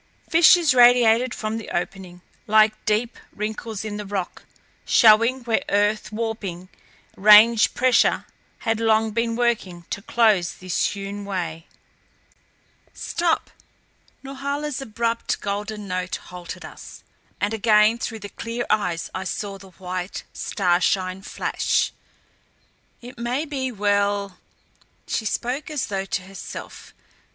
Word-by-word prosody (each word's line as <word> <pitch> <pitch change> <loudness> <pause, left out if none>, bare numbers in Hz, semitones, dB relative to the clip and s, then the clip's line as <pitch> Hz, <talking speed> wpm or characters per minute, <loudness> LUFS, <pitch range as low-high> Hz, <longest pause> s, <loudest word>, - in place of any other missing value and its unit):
Fissures 330 -2 +6
radiated 245 0 +5
from 220 -1 -3
the 225 - -9
opening, 180 0 -5 0.2
like 215 0 +3
deep 220 +3 0 0.2
wrinkles 215 0 -4
in 210 -1 -4
the 210 - -6
rock, 195 -3 -5 0.4
showing 230 +3 +5
where 230 -2 0
earth 205 0 +1
warping, 210 -5 -4 0.5
range 215 +2 +6
pressure, 255 0 +3 0.4
had 225 -1 0
long 220 -1 +2
been 230 +1 -1
working 215 -8 -1
to 200 - -3
close 215 -6 +2
this 185 -1 -1
hewn 200 0 -5
way. 170 -5 -4 1.3
"Stop," 335 -1 -1 0.7
Norhala's 280 +1 -4
abrupt, 230 -1 -2
golden 205 +1 -4
note 185 -1 -3
halted 180 -1 -9
us; - - -12 0.4
and 205 +2 -1
again 215 +1 +4
through 225 - -4
the 205 - -7
clear 230 +3 -5
eyes 180 -6 -1
I 185 - -4
saw 195 +1 -5
the 195 0 -14
white 185 0 -6
starshine 185 0 0
flash. - - -1 1.1
"It 245 0 -11
may 245 +6 -1
be 265 -4 -3
well 200 -2 0 0.3
" - - -36
She 225 - -2
spoke 250 +8 -2
as 300 -4 -2
though 195 -1 -3
to 190 -1 -3
herself. 195 +1 -9
215 Hz, 125 wpm, -23 LUFS, 195-235 Hz, 1.3 s, Fissures